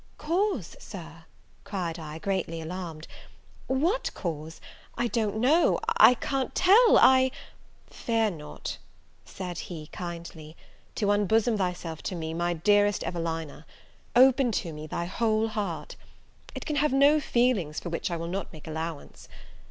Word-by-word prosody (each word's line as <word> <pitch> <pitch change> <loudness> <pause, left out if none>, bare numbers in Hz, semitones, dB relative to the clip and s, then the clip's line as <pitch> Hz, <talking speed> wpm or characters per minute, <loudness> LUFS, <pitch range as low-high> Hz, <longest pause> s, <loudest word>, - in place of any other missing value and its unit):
"Cause, 340 - -1
Sir!" 165 -4 -10 0.4
cried 175 -4 -4
I, 155 -1 -7
greatly 185 -2 -2
alarmed, 165 -1 -6 0.6
"what 330 - 0
cause? 160 -2 -5 0.4
I 240 - 0
don't 220 -1 -1
know, 285 +9 +3 0.2
I 250 - +8
can't 270 +2 -2
tell 435 +6 +6
I 260 0 +6 0.3
" - - -29 0.3
"Fear 225 -2 0
not," 150 -4 -7 0.5
said 180 -2 -6
he, 160 -4 -7
kindly, 170 -3 -8 0.4
"to 205 -1 +1
unbosom 220 +3 +2
thyself 180 -4 -3
to 185 - -4
me, 160 -1 -4
my 175 +1 0
dearest 205 +4 +3
Evelina; 165 -3 -4 0.5
open 260 0 +5
to 170 -6 -2
me 155 +1 -8
thy 170 - -3
whole 220 +3 +1
heart, 205 -6 -4 0.6
it - - -6
can 300 -2 -2
have 300 0 +2
no 285 +3 +5
feelings 235 - +1
for 175 - -6
which 165 - -2
I 170 - -2
will 165 - -4
not 195 +3 -4
make 155 -3 -12
allowance. 160 -1 -6
185 Hz, 145 wpm, -27 LUFS, 165-240 Hz, 0.6 s, I